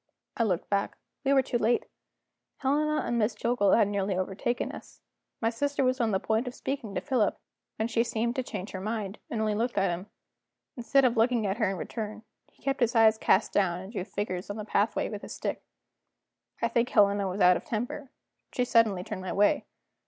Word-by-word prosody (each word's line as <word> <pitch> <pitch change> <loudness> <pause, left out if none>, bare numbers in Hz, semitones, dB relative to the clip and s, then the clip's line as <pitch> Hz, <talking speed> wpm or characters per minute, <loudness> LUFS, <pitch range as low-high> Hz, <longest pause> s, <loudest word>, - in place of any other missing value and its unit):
I - - -1
looked 185 -6 0
back. 200 0 -1 0.3
We 275 - +2
were 270 -1 +5
too 240 -2 -1
late; 235 +2 +2 0.7
Helena 300 +2 +1
and 240 0 0
Miss 215 +2 +1
Jillgall 230 -5 +2
had 215 - +4
nearly 200 -2 -1
overtaken 195 +6 -2
us. - - -12 0.4
My 225 0 +2
sister 285 +4 0
was 255 0 +1
on 230 - +2
the 190 -2 +1
point 220 +5 0
of 250 - -5
speaking 265 -8 -4
to - - -1
Philip, 245 -6 +1 0.4
when 220 - -1
she 230 0 +2
seemed 235 +1 -1
to - - +2
change 205 -5 -6
her 190 - -5
mind, 210 -1 -3
and 225 - -2
only 215 -1 +1
looked 235 +3 -1
at 195 -2 +3
him. 180 +4 -5 0.7
Instead 260 +2 +3
of 240 -2 +2
looking 230 -1 +3
at 195 +1 -1
her 220 -5 +2
in 195 - -3
return, 215 +2 -5 0.3
he - - -29
kept 275 0 0
his 240 0 +2
eyes 220 -1 +5
cast 195 - +3
down 180 -3 +2
and 190 +4 -9
drew 195 - -2
figures 185 -1 -4
on 205 - -3
the 215 - -5
pathway 210 +1 +1
with 205 -2 -6
his - - -8
stick. - - -3 1.0
I - - +4
think 235 +1 +1
Helena 200 -2 +4
was 185 +2 -4
out 180 -1 +6
of - - -4
temper; 245 +5 -4 0.4
she 250 - 0
suddenly 220 -6 +3
turned 185 - -5
my 185 -1 -4
way. 205 +1 +3
220 Hz, 210 wpm, -28 LUFS, 200-240 Hz, 1.0 s, out